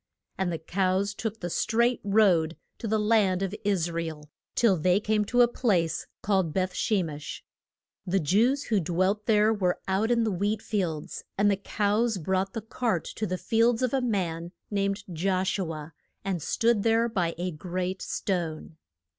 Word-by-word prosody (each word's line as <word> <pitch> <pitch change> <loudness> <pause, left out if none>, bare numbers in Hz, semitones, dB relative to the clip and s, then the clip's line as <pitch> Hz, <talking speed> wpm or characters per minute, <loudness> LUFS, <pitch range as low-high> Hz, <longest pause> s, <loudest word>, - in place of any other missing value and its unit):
And 190 -2 -1
the 165 - -2
cows 190 +4 0
took 220 +1 -4
the 175 - -3
straight 235 +6 +1
road 190 -6 +3 0.2
to 230 - -4
the 220 +1 +2
land 210 -3 +2
of 195 0 -2
Is 185 -5 +1
ra 170 0 -2
el 150 -2 -7 0.2
till 225 -5 +4
they 180 +3 +3
came 215 0 +1
to 245 +3 +4
a - - +5
place 180 -10 0 0.2
called 190 -6 +1
Beth 185 -1 0
she 205 -4 +1
mesh. 150 -2 -7 0.6
The 190 +2 +2
Jews 230 - +2
who 215 -3 +1
dwelt 185 +5 0
there 215 0 +4
were 185 -4 0
out 195 +4 +1
in 235 -1 +3
the 220 - 0
wheat 205 +3 -1
fields. 175 -8 -3
And 205 +1 +4
the - - +3
cows 210 +3 0
brought 190 +3 -1
the 225 - -3
cart 225 -5 -1
to 215 - -2
the 185 0 -2
fields 230 +6 +2
of 255 - 0
a 270 - +2
man 175 -7 -2 0.2
named 200 0 0
Josh 185 +3 0
u 175 -4 -2
a, 155 0 -8 0.3
and 190 -4 -1
stood 230 +6 +2
there 225 +2 +3
by 180 -7 -1
a 180 +1 -2
great 180 +3 -3
stone. 165 -4 -3
195 Hz, 180 wpm, -27 LUFS, 175-220 Hz, 0.6 s, a